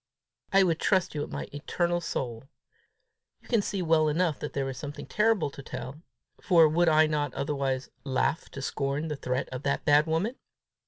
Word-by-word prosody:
I 195 -1 +6
would 165 -3 +1
trust 190 -3 +2
you 150 - -2
with - - -4
my - - -4
eternal 175 +4 -1
soul. 120 -7 -4 0.9
You - - -21
can 230 -4 +2
see 195 -2 -2
well 160 -2 +3
enough 160 0 +1
there 140 -2 -3
is 135 - -4
something 145 -1 -7
terrible 210 -8 +1
to 140 - -9
tell, 140 +2 -7 0.4
for 170 -4 +6
would 165 +2 +3
I 155 0 +5
not 150 -3 -1
otherwise 135 -2 -2
laugh 135 +4 0
to 140 - -6
scorn 140 +3 -2
the 150 - -2
threat 130 -1 -2
of 130 -1 -6
that 140 -1 -1
bad 150 +2 +5
woman? 180 +11 0
150 Hz, 180 wpm, -28 LUFS, 140-170 Hz, 0.9 s, I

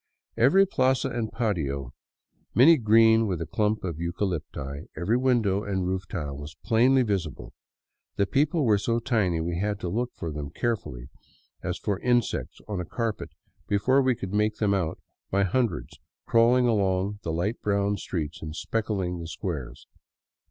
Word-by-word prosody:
Every 140 +13 +5
plaza 130 -6 +1
and 115 -3 -3
patio, 75 - -2 0.6
many 155 +7 +7
green 110 -1 +5
with 90 -4 -2
a 85 - -3
clump 105 +3 0
of 85 -4 -4
eucalypti, 85 -5 -4
every 90 +8 +1
window 120 -6 +2
and 95 -3 -2
roof 95 -1 -2
tile, 75 -7 -4
was 75 +2 -9
plainly 125 +4 +4
visible. 95 - -3 0.6
The 100 - +2
people 145 - +1
were 105 -3 +4
so 115 +3 0
tiny 110 -9 +1
we 85 +1 -2
had 105 0 -1
to 90 - -2
look 120 +6 -2
for 80 - -5
them 75 -1 -5
carefully, 75 - -3 0.5
as - - -3
for 100 -2 -2
► - - -22
insects 120 -2 0
on 100 -4 -3
a - - -3
carpet, 115 +4 -3 0.4
before 130 +7 +3
we 130 -2 +2
could 95 -2 -6
make 105 +1 +1
them 105 -2 +1
out 90 -5 -1 0.3
by 100 +1 +2
hundreds 100 - -1 0.3
crawling 120 +2 +4
along 100 -2 +1
the 85 - -3
light 90 +8 -2
brown 100 0 +1
streets 80 -3 -4
and 80 0 -6
specking 95 -6 -2
the 85 - -6
squares. 70 -8 -5
100 Hz, 165 wpm, -26 LUFS, 85-115 Hz, 0.6 s, many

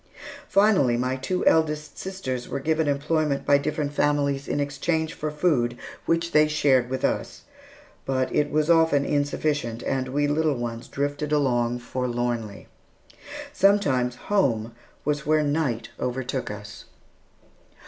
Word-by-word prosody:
Finally, 190 - +4
my 125 +2 0
two 180 +8 -2
eldest 155 -1 +2
sisters 130 -11 -4
were 140 - -2
given 160 +2 0
employment 145 0 0
by 140 0 +5
different 145 0 -2
families 140 -1 +1
in - - -1
exchange 160 +3 -1
for 155 - -4
food, 145 -6 +1 0.3
which 165 0 +1
they 155 0 +5
shared 135 -5 +2
with 130 0 -1
us; - - -2 0.6
but 130 -1 -1
it 145 0 +2
was 155 0 +1
often 160 -4 +4
insufficient, 145 -4 -1
and 130 -1 -1
we 145 +3 0
little 150 0 +1
ones 120 0 -5
drifted 145 +1 -3
along 120 -5 +1
forlornly. 120 -3 -3 0.9
Sometimes 140 -12 +2
home 120 - 0 0.3
was 150 0 -1
where 155 0 +3
night 145 -6 -1
overtook 130 +1 -3
us. 105 0 -9
145 Hz, 130 wpm, -25 LUFS, 125-155 Hz, 0.9 s, by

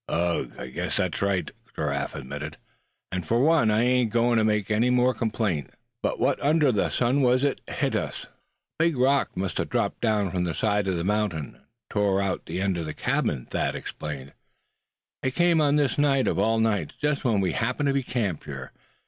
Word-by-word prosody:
"Ugh! 85 0 0 0.2
guess - - -2
that's - - -1
right," 95 -4 0 0.2
Giraffe - - -2
admitted; 75 +3 -6 0.5
"and 90 -1 -2
for 115 +9 +1
one 150 -4 +4
I 110 +2 +3
ain't 125 -1 +3
goin' 120 0 +3
to - - +2
make 105 -1 +1
any 115 +4 +3
more 125 +1 +3
complaint. 110 - -1 0.3
But - - -1
what - - +1
under 150 -1 +3
the 105 - +1
sun 130 +3 +1
was 130 +1 +3
it 140 -2 0
hit - - -1
us?" - - -3
"A 165 - -6
big 165 -5 +1
rock 135 -2 +2
must 95 0 -2
have - - -1
dropped - - -1
down 105 -5 +1
from 90 -1 -1
the 85 -2 -2
side 105 -2 +1
of 95 -2 0
the 85 - -2
mountain, 100 - -1
and - - -26 0.3
tore 100 -2 +2
out 100 -1 -2
the 85 +3 -3
end 95 -2 0
of 80 - -3
the 75 - -4
old - - -26
cabin," 60 - 0
Thad - - -2
explained. 70 -2 -6 0.9
"It 130 -1 -2
came 170 -2 +4
on 145 -1 +3
this 145 -2 +1
night 140 -3 +3
of - - +1
all 115 0 +2
nights, 105 -8 0
just 150 -1 0
when 115 -5 +2
we 95 -2 +1
happened 130 +3 -1
to 140 - +2
be 140 - +1
camped 110 - -2
here. 70 -2 -7
110 Hz, 210 wpm, -26 LUFS, 90-130 Hz, 0.9 s, one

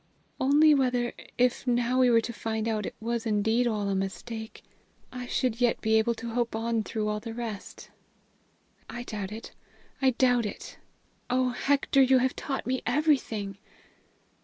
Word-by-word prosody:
"Only 295 +3 +5
whether, 250 -3 +1 0.2
if 250 +2 +1
now 245 +1 +2
we 255 -1 +5
were 230 -1 +5
to 235 - -5
find 220 -1 -3
out 215 -2 -1
it - - -7
was 230 +1 -2
indeed 220 +3 +2
all 210 -3 -1
a 200 - 0
mistake, 220 +4 -5 0.5
I 250 -1 -6
should 245 -1 -1
yet 240 -1 +3
be 220 - 0
able 235 +1 +1
to 230 +1 -6
hope 235 -1 -1
on 225 0 0
through 215 0 -3
all 210 0 -1
the 225 +1 -7
rest. 230 -4 -7 1.0
I 240 - -6
doubt 205 -4 -5
it; 220 +2 -8 0.5
I 265 - +5
doubt 245 -2 +2
it! - - -9 0.5
Oh, 255 0 +2
Hector, 275 +2 +2
you 260 0 +5
have 255 0 +1
taught 270 -2 -4
me 260 +1 -1
everything!" 245 -8 0
235 Hz, 165 wpm, -28 LUFS, 220-255 Hz, 1.0 s, Only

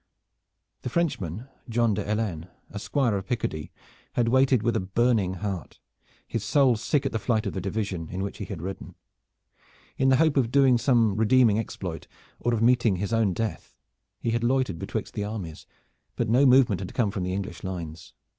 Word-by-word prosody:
The - - -4
Frenchman, 120 - -2 0.2
John 115 -1 +2
de 100 0 -2
Helennes, 100 -6 -2 0.2
a 100 - -5
squire 115 +3 0
of 95 0 -6
Picardy, 95 -10 -3 0.4
had 120 -1 +1
waited 130 -2 +3
with 120 0 +1
a - - +2
burning 100 0 +1
heart, 95 -6 -5 0.5
his 115 - -3
soul 130 +2 +4
sick 140 +6 0
at - - 0
the 115 - -1
flight 110 0 0
of 100 - -2
the 95 - -3
division 95 -4 -3
in 95 +1 -3
which 100 - -5
he - - -4
had 90 -6 -7
ridden. 95 +1 -7 1.0
In 135 - +3
the 130 - +5
hope 155 +1 +3
of 125 -4 +2
doing 135 -3 +5
some 115 -5 +3
redeeming 110 -1 +4
exploit, 90 -6 -5 0.3
or 120 - 0
of 115 -1 +1
meeting 120 -4 +4
his 100 +5 -3
own 110 -4 +2
death, 110 +3 -4 0.4
he 115 - -1
had 115 0 0
loitered 125 -8 +1
betwixt - - -4
the 105 - -2
armies, 100 -7 -6 0.5
but 120 - -1
no 125 +5 +5
movement 125 -7 +5
had 95 - -7
come 110 -5 +1
from 100 -3 -4
the 90 +1 -2
English 95 -3 -5
lines. 85 -4 -6
110 Hz, 190 wpm, -26 LUFS, 95-120 Hz, 1.0 s, the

